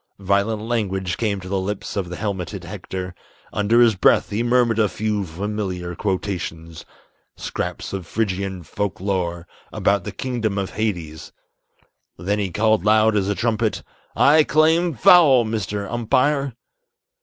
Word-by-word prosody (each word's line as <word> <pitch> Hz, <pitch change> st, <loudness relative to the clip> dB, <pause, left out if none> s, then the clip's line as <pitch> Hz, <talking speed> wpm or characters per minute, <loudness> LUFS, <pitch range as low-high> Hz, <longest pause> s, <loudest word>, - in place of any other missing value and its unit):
Violent 100 Hz, +3 st, 0 dB
language 95 Hz, -6 st, -1 dB
came 105 Hz, -4 st, -1 dB
to 90 Hz, -, -9 dB
the 95 Hz, +1 st, -1 dB
lips 95 Hz, +2 st, -4 dB
of 95 Hz, -4 st, -2 dB
the 90 Hz, -, -5 dB
helmeted 95 Hz, -3 st, -4 dB
Hector, 95 Hz, -1 st, -6 dB, 0.4 s
Under 110 Hz, +3 st, +3 dB
his 115 Hz, -2 st, +6 dB
breath 95 Hz, -, +3 dB
he 105 Hz, +3 st, -1 dB
murmured 120 Hz, -1 st, +2 dB
a 105 Hz, -2 st, +3 dB
few 105 Hz, 0 st, -2 dB
familiar 95 Hz, 0 st, -4 dB
quotations, 85 Hz, -4 st, -4 dB, 0.5 s
Scraps -, -, -4 dB
of 95 Hz, -3 st, -5 dB
Phrygian 95 Hz, -4 st, -2 dB
folk 100 Hz, +5 st, -4 dB
lore 90 Hz, -3 st, -2 dB, 0.2 s
about 100 Hz, -2 st, +1 dB
the -, -, -5 dB
kingdom 115 Hz, -6 st, -2 dB
of 95 Hz, -1 st, -2 dB
Hades; 85 Hz, -8 st, -4 dB, 0.9 s
Then 100 Hz, +5 st, -1 dB
he 100 Hz, -2 st, -1 dB
called 110 Hz, +2 st, +2 dB
loud 110 Hz, +1 st, +4 dB
as 100 Hz, -1 st, +1 dB
a 100 Hz, -, 0 dB
trumpet, 110 Hz, +2 st, -1 dB, 0.3 s
"I 155 Hz, +2 st, +6 dB
claim 160 Hz, +2 st, +3 dB
foul, 135 Hz, -2 st, +6 dB
Mr. 105 Hz, -2 st, -3 dB
Umpire!" 130 Hz, +3 st, +1 dB
105 Hz, 145 wpm, -21 LUFS, 95-115 Hz, 0.9 s, his